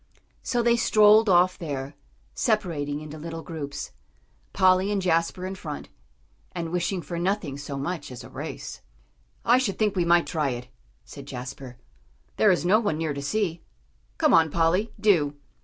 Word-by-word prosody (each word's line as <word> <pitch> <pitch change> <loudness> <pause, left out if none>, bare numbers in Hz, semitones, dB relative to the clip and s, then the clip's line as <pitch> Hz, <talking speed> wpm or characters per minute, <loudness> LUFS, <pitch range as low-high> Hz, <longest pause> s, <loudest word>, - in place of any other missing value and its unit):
So 240 -2 0
they 235 0 +4
strolled 215 -1 +5
off 180 0 +4
there, 140 -3 -5 0.4
separating 155 - -1
into 155 0 -9
little 165 +1 -6
groups; 145 -4 -6 0.6
Polly 185 +1 +3
and 205 - +1
Jasper 175 0 0
in 190 - -4
front, 155 -6 -7 0.6
and 170 -2 -4
wishing 180 +1 -1
for 170 +4 -5
nothing 180 -5 -1
so 140 0 -6
much 145 0 -4
as 125 - -8
a - - -11
race. - - -7 0.6
"I 245 +2 +5
should 220 -7 -1
think 210 -2 +1
we 180 - +2
might 170 0 +4
try 155 -4 -1
it," 125 +1 -11 0.4
said 140 -1 -11
Jasper; 130 -1 -8 0.6
"there 215 - +5
is 180 -2 +2
no 205 +5 +5
one 205 -9 -1
near 160 -2 -1
to 140 - -5
see. 170 +1 -1 0.6
Come 305 -2 +3
on, 160 -1 +5
Polly, 170 +8 +1
do." 170 -9 +3
170 Hz, 165 wpm, -25 LUFS, 145-195 Hz, 0.6 s, strolled